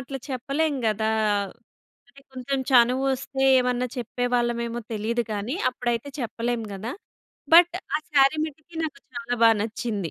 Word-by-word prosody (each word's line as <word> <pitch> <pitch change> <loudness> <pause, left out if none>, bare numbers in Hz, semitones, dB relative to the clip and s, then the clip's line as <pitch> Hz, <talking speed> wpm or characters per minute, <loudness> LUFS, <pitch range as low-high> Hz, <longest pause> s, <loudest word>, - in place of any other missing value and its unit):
అట్లా 270 +1 -6
చెప్పలేం 280 +4 -1
కదా! 220 0 +1 1.0
అంటే, 280 0 -18
కొంచెం 265 +1 -3
చనువొస్తే 265 +2 +2 0.2
ఏమన్నా 250 0 0
చెప్పేవాళ్ళమేమో 240 -1 -1
తెలీదు 225 +3 -1
కానీ. 215 - -3
అప్పుడైతే 245 +2 -3
చెప్పలేం 235 0 -2
గదా! 215 +6 -5 0.6
బట్, 345 +1 +7 0.2
ఆ - - -1
సారీ 275 +1 +5
మట్టికి 315 +2 -10
నాకు 285 -3 -5 0.2
చాలా 280 -3 -3
బా 230 - +8
నచ్చింది. 210 -5 -3
245 Hz, 125 wpm, -25 LUFS, 235-275 Hz, 1.0 s, బా